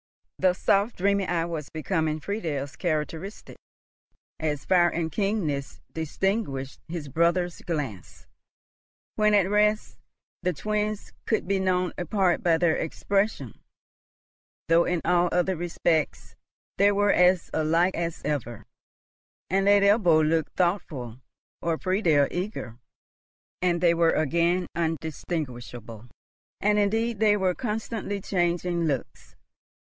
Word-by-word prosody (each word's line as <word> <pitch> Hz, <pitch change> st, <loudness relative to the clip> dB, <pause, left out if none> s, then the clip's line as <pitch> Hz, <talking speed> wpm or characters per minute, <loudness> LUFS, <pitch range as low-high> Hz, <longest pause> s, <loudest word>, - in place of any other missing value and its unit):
The 185 Hz, -1 st, +4 dB
soft 200 Hz, +4 st, +1 dB
dreamy 200 Hz, +1 st, +1 dB
eye 170 Hz, -1 st, 0 dB
was 160 Hz, -4 st, -5 dB
becoming 155 Hz, -1 st, -1 dB
Friedel's 150 Hz, -6 st, -4 dB
characteristic, 165 Hz, +3 st, -4 dB, 0.8 s
as 150 Hz, -3 st, -2 dB
fire 175 Hz, -2 st, +4 dB
and 165 Hz, -1 st, -2 dB
keenness 170 Hz, -7 st, -2 dB
distinguished 160 Hz, -4 st, -2 dB
his 165 Hz, -3 st, -5 dB
brother's 170 Hz, +4 st, +1 dB
glance. 145 Hz, -, -5 dB, 0.9 s
When 210 Hz, -1 st, +3 dB
at 195 Hz, -3 st, +4 dB
rest, 210 Hz, +1 st, +1 dB, 0.4 s
the 180 Hz, 0 st, 0 dB
twins 210 Hz, +6 st, -2 dB
could 220 Hz, -5 st, 0 dB
be 195 Hz, 0 st, +1 dB
known 185 Hz, -1 st, 0 dB
apart 180 Hz, +1 st, +1 dB
by 165 Hz, -2 st, +3 dB
their 165 Hz, -1 st, +2 dB
expression, 200 Hz, +6 st, -1 dB, 1.1 s
though 165 Hz, +1 st, +4 dB
in 175 Hz, -2 st, 0 dB
all 175 Hz, 0 st, +3 dB
other 180 Hz, +1 st, +1 dB
respects 165 Hz, -2 st, -1 dB, 0.4 s
they 200 Hz, +1 st, +6 dB
were 205 Hz, 0 st, +3 dB
as 180 Hz, 0 st, +3 dB
alike 165 Hz, +4 st, +2 dB
as 170 Hz, -1 st, -3 dB
ever; 120 Hz, -7 st, -3 dB, 0.9 s
and 195 Hz, +1 st, +2 dB
let 200 Hz, 0 st, +5 dB
Ebbo 180 Hz, -7 st, +4 dB
look 160 Hz, -1 st, 0 dB
thoughtful 150 Hz, -, -2 dB, 0.4 s
or 165 Hz, -1 st, 0 dB
Friedel 170 Hz, -7 st, +2 dB
eager 175 Hz, -, -5 dB, 0.8 s
and 175 Hz, -1 st, +2 dB
they 170 Hz, -1 st, +4 dB
were 165 Hz, -1 st, +3 dB
again 170 Hz, +4 st, +1 dB
undistinguishable; 140 Hz, -8 st, -4 dB, 0.5 s
and 210 Hz, +1 st, +2 dB
indeed 225 Hz, +2 st, 0 dB
they 210 Hz, -1 st, +4 dB
were 190 Hz, -2 st, +1 dB
constantly 215 Hz, -2 st, -3 dB
changing 175 Hz, -2 st, 0 dB
looks. 140 Hz, -5 st, -4 dB
175 Hz, 120 wpm, -26 LUFS, 160-195 Hz, 1.1 s, they